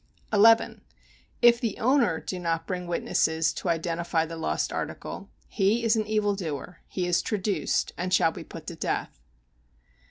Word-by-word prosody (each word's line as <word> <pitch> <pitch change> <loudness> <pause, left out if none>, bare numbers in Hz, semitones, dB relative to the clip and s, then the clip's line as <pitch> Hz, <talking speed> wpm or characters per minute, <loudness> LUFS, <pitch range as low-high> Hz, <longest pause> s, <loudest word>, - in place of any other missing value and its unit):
11. 225 +2 +5 0.6
If 235 0 +6
the 230 -5 -2
owner 240 - +2
do 185 - -5
not 165 -1 -1
bring 180 -1 -4
witnesses 160 -2 +1
to 180 - -4
identify 170 0 0
the 165 +1 -7
lost 160 - -2
article, - - -5 0.2
he 215 +3 +1
is 230 0 +3
an 215 -1 -1
evil 215 -1 +1
doer, 165 -3 -5
he 180 - -3
has 175 -1 +2
traduced, 200 -6 -1
and 180 +1 -2
shall 165 -3 +4
be - - -8
put - - -10
to - - -6
death. - - -3
185 Hz, 160 wpm, -27 LUFS, 165-215 Hz, 0.6 s, If